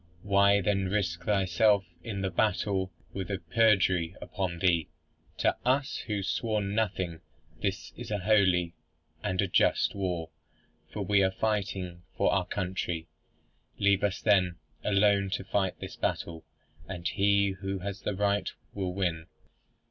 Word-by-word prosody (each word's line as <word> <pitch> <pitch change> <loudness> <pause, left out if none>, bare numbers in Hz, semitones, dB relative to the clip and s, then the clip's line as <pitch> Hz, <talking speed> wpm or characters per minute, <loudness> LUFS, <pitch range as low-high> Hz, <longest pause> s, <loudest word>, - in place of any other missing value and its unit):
Why 100 0 +4
then 100 0 +1
risk 90 -4 -1
thyself 100 0 +3 0.2
in 100 -4 -4
the 95 -1 -1
battle 95 0 0 0.2
with 95 0 -4
a 100 - -1
perjury 95 -6 +2
upon 90 0 -3
thee? 85 -3 +2 0.5
To - - +2
us, 135 +3 +1
who 105 - -1
have 100 -2 -2
sworn 105 -2 -1
nothing, 95 -6 -1 0.4
this 100 -2 -2
is 120 -1 -8
a 105 - 0
holy 95 -4 +3 0.5
and 90 +2 -2
a - - 0
just 90 - +3
war, 90 -5 -3 0.6
for - - -3
we 100 -1 +3
are 95 - +4
fighting 95 -4 -2 0.2
for - - +3
our - - +1
country. 90 -3 -3 0.7
Leave 100 -1 +3
us 100 -2 0
then, 95 -5 +3 0.3
alone 100 -1 +3
to - - -2
fight 95 -1 -1
this - - -7
battle, 80 -1 -3 0.4
and 90 -2 -4
he 100 +3 +3
who 95 0 -2
has 95 +1 -5
the 105 - -2
right 100 0 +1 0.2
will 95 -2 -3
win." 85 -4 -1
95 Hz, 150 wpm, -29 LUFS, 90-100 Hz, 0.7 s, Why